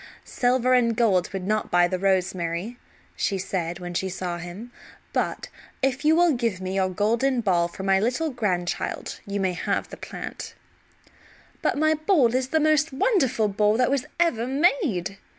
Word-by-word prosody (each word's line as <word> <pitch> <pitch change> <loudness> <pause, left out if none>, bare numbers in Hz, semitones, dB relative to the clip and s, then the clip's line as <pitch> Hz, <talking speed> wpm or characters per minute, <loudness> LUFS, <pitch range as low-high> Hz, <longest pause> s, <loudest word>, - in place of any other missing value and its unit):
"Silver 250 0 +1
and 235 -2 +3
gold 195 -7 +2
would 190 -2 -4
not 215 +1 -1
buy 175 0 +4
the 185 0 -3
rosemary," 185 +3 -1 0.4
she 195 - -1
said 175 -2 -3
when 175 -1 -7
she 190 +2 -1
saw 175 -2 -4
him; 180 +8 -8 0.4
"but - - -1 0.4
if 270 +1 0
you 310 +1 +5
will 345 0 +4
give 230 -7 -1
me 185 0 -4
your 190 -1 +1
golden 230 +7 +1
ball 180 -6 +2
for 180 +2 -9
my 195 0 +3
little 255 +9 0
grandchild 185 -8 -2
you 200 0 -2
may 190 -2 0
have 175 - -2
the - - -9
plant." - - -8 1.1
"But - - 0
my 310 +1 +3
ball 310 - +2
is 255 0 0
the 315 +4 +1
most 310 0 +2
wonderful 265 - +2
ball 210 +1 +2
that 250 +1 +2
was 275 -3 0
ever 250 -9 +1
made!" 270 - +1
215 Hz, 170 wpm, -25 LUFS, 185-265 Hz, 1.1 s, you